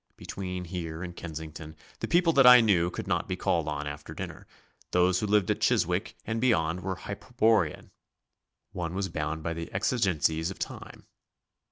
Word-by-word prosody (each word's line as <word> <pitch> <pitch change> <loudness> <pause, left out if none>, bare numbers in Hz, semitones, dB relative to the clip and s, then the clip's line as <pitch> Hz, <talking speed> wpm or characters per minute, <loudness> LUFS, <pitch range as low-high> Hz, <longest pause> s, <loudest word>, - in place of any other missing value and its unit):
Between 90 -2 -5
here 85 -1 -5
and 90 -1 -7
Kensington 80 -1 -8 0.2
the - - -3
people 170 -1 +3
that 135 -3 +6
I 125 0 +11
knew 95 -7 +3
could - - -6
not - - -1
be - - -2
called 85 -3 0
on 75 -1 -3
after 75 0 -7
dinner, - - -7 0.4
those 90 +1 +3
who 105 - -1
lived 105 -2 +3
at - - -2
Chiswick - - +1
and 110 +1 -2
beyond 90 -8 +2
were 95 +1 -3
hyperborean 105 -3 0 0.8
one 85 -1 -4
was 95 0 -1
bound 80 -1 -3
by 85 - -2
the 85 0 -6
exigencies 90 - +1
of 95 - -7
time. - - -7
90 Hz, 170 wpm, -28 LUFS, 80-100 Hz, 0.8 s, I